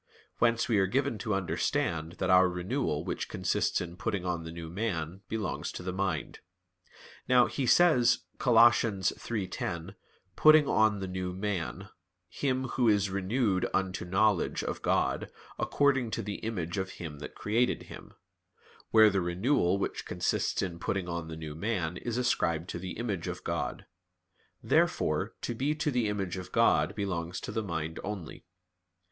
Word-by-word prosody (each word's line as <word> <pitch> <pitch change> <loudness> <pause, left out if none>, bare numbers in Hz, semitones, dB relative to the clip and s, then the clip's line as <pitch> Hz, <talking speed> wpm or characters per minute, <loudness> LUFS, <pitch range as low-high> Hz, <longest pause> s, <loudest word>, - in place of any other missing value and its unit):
Whence 115 -1 +3
we 110 -4 +3
are 95 - +3
given 130 +1 0
to 105 0 -1
understand 85 -3 -1
that 95 0 -1
our 90 0 +6
renewal 90 - -2
which - - -3
consists - - 0
in 85 0 -7
putting 100 -3 -2
on 90 -2 -1
the 80 - -7
new 85 0 -7
man, 90 -2 -3
belongs 110 -3 -3
to - - -7
the 90 0 -3
mind. 95 -5 -2 0.9
Now, 125 -1 +6
he 135 -3 -2
says 130 -7 +5 0.2
(Col. 125 -3 +2
3:10): 100 -5 +2 0.4
"Putting 155 +2 +7
on 110 -2 +3
the 95 - -3
new" 90 0 -3
man; 100 0 -3 0.4
"him 130 +5 -1
who 125 -2 +1
is 105 -2 +2
renewed 100 0 0
unto 95 -2 -1
knowledge" 95 +2 +1
of - - -4
God, - - 0 0.3
"according 135 -4 +2
to 115 - -3
the 100 0 -5
image 95 -5 -3
of 95 0 -4
Him 75 -4 -7
that - - -8
created 115 +4 0
him," - - -12 0.7
where 110 -1 +7
the 95 -1 +1
renewal 90 +2 +1
which 100 - -3
consists - - 0
in 85 -3 -4
putting 95 0 -2
on 85 -2 -4
the 80 -1 -7
new 80 -2 -6
man 90 -1 -2
is 120 -1 -3
ascribed 90 -9 0
to 85 - -4
the 90 0 -5
image 105 -7 -3
of - - -5
God. - - -3 0.8
Therefore - - +1
to - - -2
be 140 +6 0
to 150 -1 -1
the 120 -4 +1
image 95 -3 -2
of 90 0 -7
God 115 0 +3
belongs 90 -4 -3
to - - -5
the 110 - -1
mind 80 -5 -4
only. 100 -6 -6
95 Hz, 165 wpm, -30 LUFS, 90-115 Hz, 0.9 s, Putting